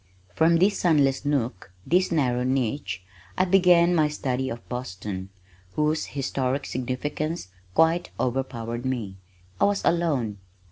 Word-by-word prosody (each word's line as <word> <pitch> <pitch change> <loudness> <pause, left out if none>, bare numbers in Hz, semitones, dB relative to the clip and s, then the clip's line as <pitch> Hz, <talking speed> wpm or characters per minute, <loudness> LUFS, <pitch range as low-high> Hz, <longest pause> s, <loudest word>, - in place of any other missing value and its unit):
From 165 - +4
this 195 +4 +3
sunless 145 -5 +2
nook, 125 -10 -1
this 180 +2 +2
narrow 125 -6 +1
niche, 125 -7 -1 0.3
I 185 - +3
began 180 -2 +5
my 155 -3 +4
study 130 -3 -2
of 115 - -7
Boston, 95 -6 -5 0.4
whose 155 +1 0
historic 135 0 -1
significance 140 - -3 0.3
quite 165 +2 +3
overpowered 120 -2 -2
me. 115 -7 -3 0.4
I - - +5
was 200 0 0
alone. 140 -12 +1
135 Hz, 125 wpm, -25 LUFS, 120-165 Hz, 0.4 s, began